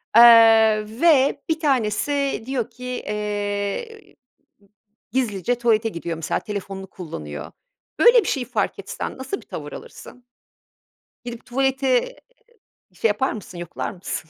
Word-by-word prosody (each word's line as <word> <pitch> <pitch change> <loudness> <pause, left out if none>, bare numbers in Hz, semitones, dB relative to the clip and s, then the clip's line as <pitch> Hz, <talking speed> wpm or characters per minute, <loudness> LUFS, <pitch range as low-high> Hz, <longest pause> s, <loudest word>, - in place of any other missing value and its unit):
Eee, 225 -2 +7 0.2
ve 285 -4 +4
1 320 0 +1
tanesi 270 -1 0
diyor 255 -3 -2
ki, 250 +2 -11
eee, 210 - -4 1.0
gizlice 240 -2 0
tuvalete 225 -1 +2
gidiyor 170 -2 -5
mesela, 160 - -2
telefonunu 195 -2 -6
kullanıyor. 75 - -8 0.5
Böyle 480 0 +7
bir - - -6
şey 260 -4 -1
fark 220 -5 -2
etsen 195 - -6
nasıl 265 +10 -4
bir - - -21
tavır - - -7
alırsın? 250 - -11 1.0
Gidip 235 -1 -7
tuvaleti 265 - +1 0.8
şey 225 - +1
yapar 215 +6 0
mısın, 195 -4 -9
yoklar 175 -1 -5
mısın, 175 -4 -6
230 Hz, 120 wpm, -22 LUFS, 205-265 Hz, 1.0 s, Eee